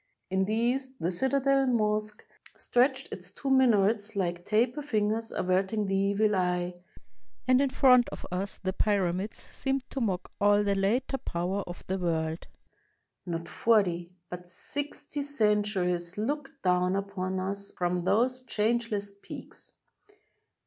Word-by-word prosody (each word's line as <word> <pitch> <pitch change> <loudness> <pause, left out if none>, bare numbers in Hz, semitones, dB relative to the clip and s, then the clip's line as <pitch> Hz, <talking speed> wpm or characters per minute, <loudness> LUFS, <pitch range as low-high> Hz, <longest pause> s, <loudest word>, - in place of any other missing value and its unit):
In 190 0 +2
the 215 +2 -1
east, 260 +3 0
the 170 - 0
citadel 270 +6 +2
mosque 215 -3 0 0.3
stretched 265 +2 +1
its 180 -1 -7
two 270 +8 -4
minarets 220 -4 +3
like 175 -2 -2
taper 235 +7 +2
fingers 225 -4 0
averting 190 +3 0
the 195 - -2
evil 200 +2 +2
eye; 180 -1 0 0.7
and 255 +1 +5
in 280 - +2
front 250 -2 +5
of - - -8
us 190 +3 -3
the 190 -1 -3
Pyramids 195 0 0
seemed 270 -1 -2
to 270 - -3
mock 190 -6 -1
all 205 0 +5
the 200 -1 +2
later 235 +8 0
power 180 +4 -2
of 175 - -8
the 190 +1 -2
world. 160 -2 -1 0.8
Not 170 -1 -3
forty, 180 -7 +2 0.2
but 180 0 -8
sixty, 290 +8 -4
centuries 210 -9 0
look 275 +6 -2
down 180 0 +2
upon 190 -1 -2
us 200 +1 -4
from 175 0 -1
those 245 +7 +2
changeless 215 -3 -1
peaks. - - -9
205 Hz, 135 wpm, -29 LUFS, 185-245 Hz, 0.8 s, and